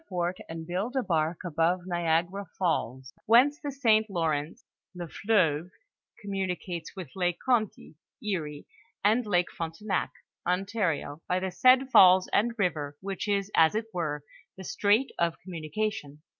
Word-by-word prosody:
fort, 180 -1 -1
and 165 0 -6
build 190 +9 -3
a 260 - +1
bark 160 -2 0
above 170 +2 +1
N 180 - -11
lagara 175 +3 0
falls, 135 -7 -1
whence 255 +7 +5
the 290 - -3
St. 220 -5 +3
Lawrence 160 -4 -2 0.3
(Ze 175 - -4
Fleuve) 170 -4 +1 0.5
communicates 190 -3 -4
with 185 -4 -8
Lake 175 -2 0
Conty 230 -5 0 0.3
(Erie), 165 - -4 0.4
and 220 +2 +3
Lake 180 -3 +1
Frontenac 165 +5 -3 0.3
(Ontario), 180 -5 -1
by 180 - +1
the 190 0 -3
said 255 +5 +4
falls 185 -3 +7
and 235 +3 +2
river, 150 -7 -1
which 195 +1 -4
is, 200 0 0
as 160 +5 +5
it 220 +1 -1
were, 150 -5 -2 0.3
the 190 - -8
strait 210 +8 +2
of 170 -1 +1
commnnication. 160 -2 -4
180 Hz, 145 wpm, -28 LUFS, 165-210 Hz, 0.5 s, falls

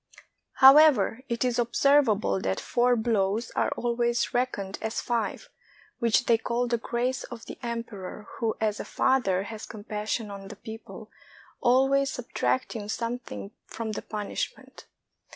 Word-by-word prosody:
However, 265 -4 +7
it 235 +1 0
is 245 -1 0
observable 235 - +3
that 95 0 -1
four 245 +1 +2
blows 220 -1 0
are - - +1
always 235 0 0
reckoned 205 -6 -1
as 220 +1 -2
five, 240 - -2 0.5
which 235 +2 +3
they 230 -1 +4
call 240 +2 -1
the 235 -1 0
grace 245 +3 -1
of 235 -2 -9
the - - -9
emperor, 230 -4 -6
who 225 -2 0
as 215 -1 0
a - - -3
father 195 -8 +1
has 220 +1 -8
compassion 210 0 -4
on 195 -1 -8
the 210 - -9
people, 220 +2 -10 0.5
always 270 +3 +3
subtracting 250 -3 -2
something 230 - -4 0.2
from 225 -1 -5
the 215 - -4
punishment. 210 -2 -5
230 Hz, 135 wpm, -27 LUFS, 210-245 Hz, 0.5 s, However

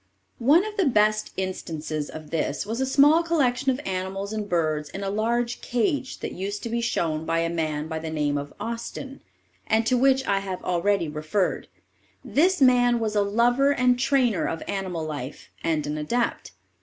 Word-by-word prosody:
One 300 - +5
of 430 0 -6
the 380 -6 +3
best 215 -3 +2
instances 160 -5 -4
of 155 -1 -9
this 155 -1 -1
was 225 +4 -3
a 265 - +1
small 295 +5 +5
collection 280 -6 +1
of 260 0 +1
animals 190 +2 -3
and 210 -1 -4
birds 155 -3 0
in 195 - -6
a 195 - -2
large 235 +3 -1
cage 260 +1 -1
that - - -4
used 200 +2 -4
to 235 - -3
be 235 +1 -1
shown 160 -8 -1
by 165 +1 0
a 165 0 -1
man 155 -2 -2
by 160 -1 -4
the 160 0 -5
name 150 -2 0
of 145 0 -4
Austin, 235 +4 -6 0.5
and 220 +1 +2
to 255 - +2
which 265 0 +3
I 200 -1 +2
have 190 -2 -5
already 180 0 +1
referred. 155 +6 -1 0.6
This 365 +5 +2
man 245 -2 +5
was 215 -2 -2
a 205 - +4
lover 240 +7 +3
and 250 -2 +2
trainer 260 -5 +2
of 165 - -4
animal 185 -5 -3
life, 145 -3 -7
and 160 -2 0
an 150 +1 -3
adept. 235 +11 -2
205 Hz, 185 wpm, -25 LUFS, 165-250 Hz, 0.6 s, One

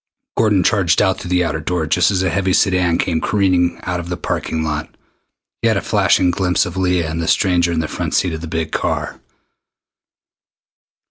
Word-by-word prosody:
Gordon 105 -5 +2
charged 95 -6 +2
on 95 -2 +3
through 90 - -9
the 90 0 +2
outer 80 -2 -2
door 80 +1 -2
just 75 - +2
as 95 -2 0
a 95 - 0
heavy 95 +1 0
sedan 90 -4 +2
came 80 -2 -1
careening 90 -4 +1
out 90 -1 -2
of 85 0 -7
the 90 - -3
parking 80 -2 -3
lot. 75 0 -3 0.7
He - - +2
had - - +2
a - - -1
flashing 90 -1 +2
glimpse 90 -1 +1
of 90 - -6
Leah 90 -3 0
and 80 +1 -3
the 85 - -3
stranger 90 -3 +2
in 80 -1 0
the 80 - -3
front - - -3
seat 90 - +1
of 80 - -5
the 85 - -6
big 80 0 -3
car. - - -3
90 Hz, 200 wpm, -18 LUFS, 80-95 Hz, 0.7 s, on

